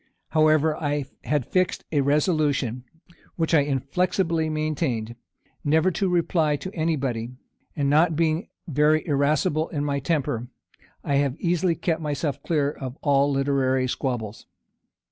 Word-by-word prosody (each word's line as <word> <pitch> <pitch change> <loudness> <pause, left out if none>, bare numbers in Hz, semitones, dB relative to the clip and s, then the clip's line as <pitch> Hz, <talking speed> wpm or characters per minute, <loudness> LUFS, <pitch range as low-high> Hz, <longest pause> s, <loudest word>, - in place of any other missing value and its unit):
However, 155 0 +3
I 145 -2 -1 0.2
had 140 0 0
fixed 185 -1 0
a 145 -3 +2
resolution, 140 - +1 0.5
which 165 -1 -1
I 160 - +7
inflexibly 160 +4 0
maintained, 150 -7 -2 0.5
never 160 +5 +3
to 195 +1 0
reply 165 -3 +2
to 185 +8 -7
any 165 -1 0
body; 125 -3 -3 0.4
and 145 -2 0
not 155 +3 +3
being 160 +1 0 0.2
very 150 +1 +2
irascible 150 +2 +1
in 145 -2 -2
my 140 -1 0
temper, 130 -6 -1 0.6
I 140 - +1
have 140 0 0
easily 175 0 +1
kept 165 -1 -1
myself 145 -2 -2
clear 145 -3 0
of 130 -2 -7
all 140 -1 +3
literary 135 -2 +1
squabbles. 120 -4 -4
150 Hz, 135 wpm, -24 LUFS, 140-160 Hz, 0.6 s, I